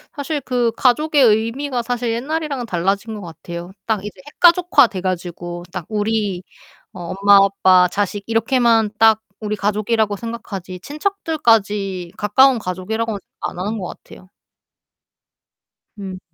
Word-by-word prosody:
사실 290 +1 -3
그 245 -3 0
가족의 290 +2 +3
의미가 240 +4 +1
사실 240 0 -2
옛날이랑은 280 +1 -3
달라진 195 +3 -1
것 - - -9
같아요. 170 0 -8
딱 215 -3 -1
이제 210 - -8
핵가족화 350 -6 +5
돼 185 -4 -6
가지고 175 -1 -4
딱 180 -3 -6
우리 210 -3 -1 0.5
어 175 -2 -6
엄마 200 0 +6
아빠 185 -2 +4
자식 205 0 -2
이렇게만 225 -1 +2
딱 220 0 +5 0.2
우리 210 0 -2
가족이라고 210 +1 0
생각하지 195 -5 -7
친척들까지 225 - -1
가까운 255 +5 +4
가족이라고는 210 +4 -3 0.2
안 180 - -5
하는 210 +4 -2
것 180 - -4 0.2
같아요. 185 - -15 1.7
음. 190 -2 -7
215 Hz, 300 characters per minute, -19 LUFS, 190-240 Hz, 1.7 s, 엄마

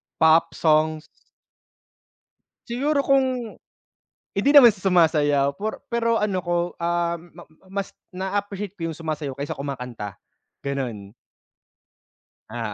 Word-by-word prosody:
Pop 160 +1 +4
songs. 155 0 +2 1.7
Siguro 280 +4 0
kung 260 -4 +1 0.8
hindi 200 +8 +1
naman 250 -5 +10
sa 205 - -15
sumasayaw 150 -5 +3
por 215 +1 -4
pero 230 0 +1
ano 200 -4 0
ko, 175 0 -1 0.2
um, 170 0 0 0.2
ma - - -11 0.3
mas 195 0 -4 0.2
naa-appreciate 200 +1 -3
ko 165 - -2
yung 160 - -6
sumasayaw 155 -4 -4
kaysa 140 +1 -5
kumakanta, 125 -7 -5 0.5
ganun. 125 -8 -4 1.4
Ah, 120 +2 -5
170 Hz, 110 wpm, -24 LUFS, 145-210 Hz, 1.7 s, naman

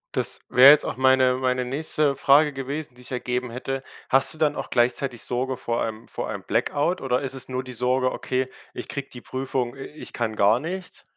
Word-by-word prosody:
Das - - -2
wäre 135 +3 +9
jetzt 150 - +4
auch - - -4
meine 130 -1 +4
meine 130 0 0
nächste 145 +2 0
Frage 145 +2 +5
gewesen, 135 0 -5
die 125 - -16
ich 125 - -12
ergeben 125 0 -2
hätte. 135 +2 -4 0.3
Hast 135 +3 +3
du - - -10
dann 155 -1 +2
auch - - -5
gleichzeitig 120 0 0
Sorge 130 +1 -2
vor 120 0 -2
einem 110 0 -5
vor - - -4
einem - - -5
Blackout 165 +5 0
oder 130 0 0
ist 135 -1 -3
es 130 -1 -7
nur 130 0 -3
die 130 - -9
Sorge: 130 +2 +1
„Okay, 130 0 -2 0.2
ich - - -6
kriege 140 -1 -5
die 125 - -10
Prüfung 130 -2 -3
äh, 135 - -7
ich 150 - -10
kann 115 -2 -2
gar 105 +4 +4
nichts?“ 180 +4 -6
130 Hz, 215 wpm, -24 LUFS, 125-140 Hz, 0.3 s, wäre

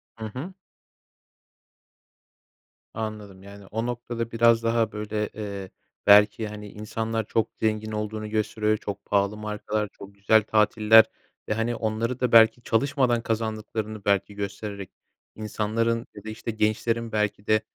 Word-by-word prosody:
Hı 110 - -7
hı. 130 - -6 2.4
Anladım. 105 -3 -6
Yani, 100 0 -12
o 115 +3 -2
noktada 120 -1 -4
biraz 115 0 +4
daha, 115 -1 +1
böyle, 105 0 -3
eee, 100 -3 -6 0.4
belki, 105 +2 +6
hani, 105 0 -8
insanlar 110 +2 -3
çok 115 - 0
zengin 110 0 0
olduğunu 105 0 -4
gösteriyor. 110 0 0
Çok 100 -1 -6
pahalı 100 +1 +1
markalar, 105 0 -3
çok 100 0 -12
güzel 100 +2 +4
tatiller 110 +1 +5 0.4
ve - - +2
hani, 115 +2 -1
onları 115 +3 -2
da 125 -2 0
belki 115 +1 +6
çalışmadan 125 0 +1
kazandıklarını, 110 -1 -3
belki, 100 0 +1
göstererek 100 -1 -5 0.5
insanların 110 +2 -1
ya - - -10
da, 110 - -7
işte, 110 +1 -5
gençlerin 115 +1 0
belki 105 -1 -1
de 110 0 +4
110 Hz, 130 wpm, -25 LUFS, 105-115 Hz, 2.4 s, belki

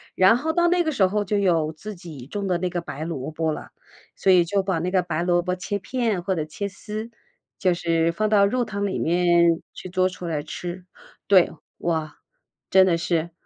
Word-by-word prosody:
然 190 +4 +6
后 315 +5 -1
到 345 +1 +3
那 350 0 +3
个 315 - 0
时 200 -10 +3
候 205 +2 0
就 205 +1 -1
有 165 -6 +2
自 210 +7 -8
己 155 -8 -10
种 200 +5 -4
的 180 -2 +1
那 180 +1 -1
个 175 0 -3
白 155 -2 -6
萝 155 -4 -4
卜 160 0 -1
了， - - -8 0.5
所 - - +1
以 180 -2 +6
就 195 +4 0
把 190 -3 -1
那 180 +3 -2
个 185 -1 +3
白 170 -2 -2
萝 175 0 +2
卜 180 +1 -2
切 200 +2 -3
片 225 -3 -1
或 190 - 0
者 155 -3 -2
切 200 +6 -4
丝， 215 +3 -7 0.5
就 185 -2 +3
是 165 -1 +1
放 215 +4 0
到 205 -2 +5
肉 245 +5 +1
汤 200 -3 -3
里 190 - -2
面 170 -1 +3
去 185 - -9
做 185 0 +2
出 180 -1 -7
来 155 -3 -1
吃。 175 +3 -6 0.4
对， 190 -3 +5 0.3
哇， 160 -3 -2 0.5
真 190 -1 +6
的 170 -2 +3
是 170 -1 -1
180 Hz, 230 characters per minute, -24 LUFS, 170-200 Hz, 0.5 s, 然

